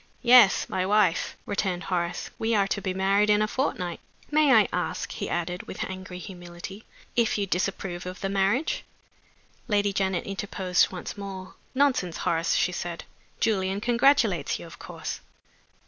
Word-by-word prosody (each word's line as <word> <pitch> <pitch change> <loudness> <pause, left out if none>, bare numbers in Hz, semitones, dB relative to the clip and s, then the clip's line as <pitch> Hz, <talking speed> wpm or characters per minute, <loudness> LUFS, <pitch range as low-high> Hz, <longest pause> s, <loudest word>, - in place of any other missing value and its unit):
"Yes. 240 -4 +7
My 185 - -1
wife," 195 -3 +2
returned 195 -3 -1
Horace. 175 -2 -2
"We 225 0 +1
are 200 -1 +3
to 200 - -1
be 190 - -2
married 195 +2 +2
in 210 0 +4
a - - +1
fortnight. 180 -9 -2 0.3
May 300 -2 +4
I 220 -5 +6
ask," 180 - -2
he - - -4
added, 175 +1 -3
with - - -4
angry 185 -1 -7
humility, 180 +2 -9 0.3
"if 235 -2 +2
you 200 - 0
disapprove 180 -1 -2
of 185 0 -6
the 195 - -2
marriage?" 200 - +1 0.8
Lady 205 -2 +2
Janet 190 -2 0
interposed 195 -2 0
once 185 +2 -6
more. 190 -2 -7 0.2
"Nonsense, 255 -11 +2
Horace," 165 0 +1
she 180 - +2
said. 175 -1 -5 0.4
"Julian 195 -2 +1
congratulates 245 +5 +3
you, - - -10
of - - -12
course." - - -6
195 Hz, 155 wpm, -26 LUFS, 180-210 Hz, 0.8 s, Yes